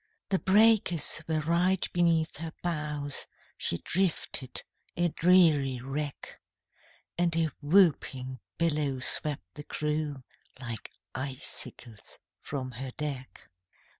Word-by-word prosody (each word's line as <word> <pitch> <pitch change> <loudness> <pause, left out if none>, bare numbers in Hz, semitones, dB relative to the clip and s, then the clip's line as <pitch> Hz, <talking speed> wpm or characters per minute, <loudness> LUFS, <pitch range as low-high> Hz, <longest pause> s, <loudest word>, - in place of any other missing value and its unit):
The 190 - +2
breakers 200 -6 +4
were 160 -1 0
right 175 +4 +2
beneath 165 -3 +2
her 165 +1 -5
bows, 150 -4 -3 0.3
She 85 - 0
drifted 165 - -1 0.3
a 175 0 +2
dreary 155 -7 +4
wreck, 140 +3 -5 0.8
And 170 -1 +2
a 165 -2 +1
whooping 145 -6 +2 0.2
billow 150 -5 +1
swept 130 -7 +2
the 150 - -8
crew 150 -3 -3 0.4
Like 115 -4 -3 0.2
icicles 130 -4 -4 0.2
from 130 -3 -5
her 130 +2 -6
deck. 140 -6 -5
150 Hz, 105 wpm, -29 LUFS, 135-170 Hz, 0.8 s, breakers